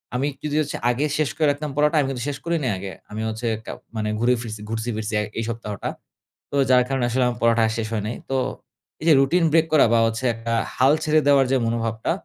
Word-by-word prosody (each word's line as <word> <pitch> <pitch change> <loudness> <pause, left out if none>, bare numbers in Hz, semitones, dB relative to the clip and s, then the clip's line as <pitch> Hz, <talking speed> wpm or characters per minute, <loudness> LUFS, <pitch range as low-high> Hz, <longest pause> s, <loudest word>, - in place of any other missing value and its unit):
আমি 135 +3 +1
কিছু 150 -1 -4
যদি 155 - 0 0.2
আগে 130 +5 0
শেষ 155 -3 +1
করে 155 - +2
রাখতাম 145 +1 -4
পড়াটা 150 +2 +3
আমি 140 - +1
কিন্তু 125 -3 -4
শেষ 140 - -4
করি 170 0 0
নাই 125 - +1
আগে। 95 +1 -6 0.2
আমি 110 +1 -4
হচ্ছে 110 +2 -4 0.2
কা - - -5 0.2
মানে 105 -1 -1
ঘুরে 120 +2 +3
ফিরছি 110 -3 -7
ঘুরছি 115 +1 -3
ফিরছি 110 0 -4 0.3
এই - - -1
সপ্তাহটা। 105 -4 -4 0.6
তো - - -3
যার 125 -1 +6
কারণে 135 -2 0
আসলে 125 +2 +1
আমার 120 -2 -2
পড়াটা 115 0 +3
আর - - -1
শেষ 110 -1 -2
হয় 105 -2 -1
নাই। 115 - -3
তো 135 - 0 0.6
এই - - -5
যে - - +8
রুটিন 165 +6 +3
ব্রেক 160 +1 +4
করা 155 - +6
বা 115 - +5
হচ্ছে 115 +3 -3
একটা 115 +1 -4 0.2
হাল 135 +3 +4
ছেড়ে 155 0 +3
দেওয়ার 140 -2 +5
যে 135 - +4
মনোভাবটা, 115 +2 -1
125 Hz, 235 wpm, -23 LUFS, 115-145 Hz, 0.6 s, যে